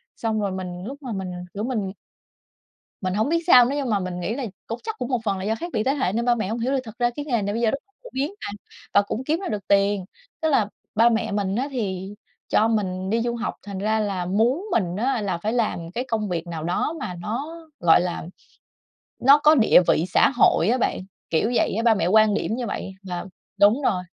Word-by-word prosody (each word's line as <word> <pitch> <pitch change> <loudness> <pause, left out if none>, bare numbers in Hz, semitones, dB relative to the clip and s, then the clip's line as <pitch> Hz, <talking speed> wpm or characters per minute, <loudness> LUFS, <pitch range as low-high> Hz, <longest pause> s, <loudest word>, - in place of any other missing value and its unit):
xong 220 -2 -1
rồi 200 -2 -1
mình 180 -1 -5
lúc 270 +5 -6
mà 250 - -5
mình, 190 -2 -4 0.2
kiểu, 205 - -4
mình 220 -6 -2 1.1
mình 185 -1 -2
hông 220 +6 +1
biết 335 - +2
sao 250 -8 +8
nữa 275 +4 -1
nhưng 270 -5 -1
mà 205 - +2
mình 180 -1 -4
nghĩ 215 +6 -2
là 275 - -3 0.2
cũng 230 +1 -4
chắc 445 -1 -5
cũng 245 - -3
một 250 -3 0
phần 200 -3 0
là 190 - -5
do 220 +2 +1
khác 335 - -5
biệt 215 -2 0
thế 270 - +2
hệ 260 -10 0
nên 235 +2 -1
ba 240 0 +4
mẹ 215 -4 -2
hông 225 - -2
hiểu 245 +3 -1
được, 270 - +1
thực 220 +1 -11
ra 240 0 +2
cái 290 - -4
nghề 240 -7 0
này 205 +1 -2
bây 230 - -1
giờ 220 - +3
rất 275 - -2 0.2
phổ - - -11
biến 285 +9 -2
mà - - -5 0.4
và 200 - +6
cũng 220 +5 -4
kiếm 315 +6 0
ra - - -4
được 210 -3 -4
tiền. 200 -1 +3 0.4
Tức 315 - +1
là 225 -8 +2 0.3
ba 230 +2 +6
mẹ 225 -3 0
mình 200 -1 -1
á 270 +4 -1
thì 195 -5 -3 0.3
cho 220 - +3
mình 190 -4 -1
đi 230 +2 +2
du 235 0 -1
học 235 -1 -3
thành 200 -2 -5
ra 215 +2 +1
là 195 -4 -2
muốn 235 - +1
mình 180 - +1
á 245 +2 0
là 185 -4 -1
phải 210 +6 -2
làm 210 -8 -1
cái 245 +6 -3
công 220 -3 -1
việc 175 -2 -3
nào 165 -2 -5
đó 180 - -1
mà 185 - -4
nó, 270 - -4 0.2
gọi 170 -1 +6
là, 175 -2 -3 0.9
nó 275 +3 +7
có 305 +1 +6
địa 220 -8 +6
vị 160 - +3
xã - - +4
hội 195 -5 +4
á 250 - +2
bạn, - - 0 0.3
kiểu 190 +9 +1
vậy - - +2
á. 225 - 0
Ba 230 -1 +5
mẹ 195 - 0
quan 215 +1 +5
điểm 220 - -1
như 245 - -3
vậy 195 - -4
và 180 -2 -5 0.4
đúng 215 +8 +5
rồi. 185 -8 +1
220 Hz, 255 wpm, -24 LUFS, 190-245 Hz, 1.1 s, sao